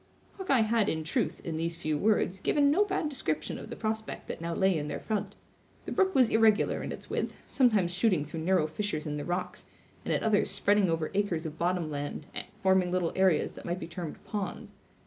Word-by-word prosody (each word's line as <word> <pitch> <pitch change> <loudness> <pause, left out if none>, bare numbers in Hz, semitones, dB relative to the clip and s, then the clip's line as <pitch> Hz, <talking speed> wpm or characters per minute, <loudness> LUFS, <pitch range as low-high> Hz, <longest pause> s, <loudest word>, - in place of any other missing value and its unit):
Hawkeye 275 -11 +3
had, 220 -1 +2
in 160 0 -2
truth, 160 - -2
in 160 -2 -3
these 165 +1 -1
few 155 -2 -1
words, 190 +1 +1
given 285 +7 +3
no 375 +8 +4
bad 380 -5 -1
description 155 - -2
of - - -9
the - - -5
prospect 220 0 -4
that - - -6
now 170 0 -2
lay 190 -1 +3
in 150 -2 -2
their - - -3
front. 210 -2 -3 0.5
The - - -5
brook 380 -1 +2
was 255 -4 +5
irregular 220 -1 +3
in - - -4
its - - -8
width, - - -3
sometimes 215 -9 +3
shooting 180 -5 +2
through 160 +2 -6
narrow 175 0 +2
fissures 155 0 -3
in 150 -1 -3
the 145 - -4
rocks, 175 +1 -3 0.4
and - - -3
at - - +1
others 215 -2 +3
spreading 200 -1 +3
over 165 -1 -1
acres 195 -5 0
of 160 0 -6
bottom 175 -2 0
land, 145 +1 -4 0.4
forming 190 -2 +3
little 180 -2 0
areas 190 -5 +3
that - - -11
might 175 +1 -2
be - - -5
termed 170 -2 -6
ponds. 205 -2 -4
185 Hz, 210 wpm, -29 LUFS, 160-215 Hz, 0.5 s, was